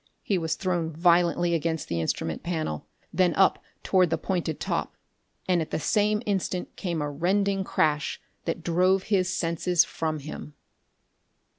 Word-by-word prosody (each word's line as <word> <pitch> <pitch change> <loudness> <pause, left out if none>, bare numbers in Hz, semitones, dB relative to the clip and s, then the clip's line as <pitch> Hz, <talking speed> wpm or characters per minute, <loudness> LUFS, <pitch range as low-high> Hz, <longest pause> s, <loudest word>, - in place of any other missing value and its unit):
He 195 -3 +1
was 160 -1 -1
thrown 175 -4 -1
violently 170 +1 +3
against 160 -1 -1
the 85 -1 -1
instrument 80 0 -2
panel; 160 - -3 0.3
then 175 -2 +3
up 195 - +4 0.2
toward 185 -3 +3
the 160 - +1
pointed 170 -2 -2
top; - - -2 0.5
and 180 -2 +3
at 160 - -4
the - - -2
same 210 +5 +1
instant 190 -3 -2
came 170 -5 -2
a 145 - -3
rending 195 +5 +1
crash 150 -5 0 0.3
that 165 0 -3
drove 185 +3 +3
his 185 -3 +1
senses 170 0 +2
from 155 -1 -2
him.... 150 0 -8
170 Hz, 150 wpm, -27 LUFS, 160-185 Hz, 0.5 s, up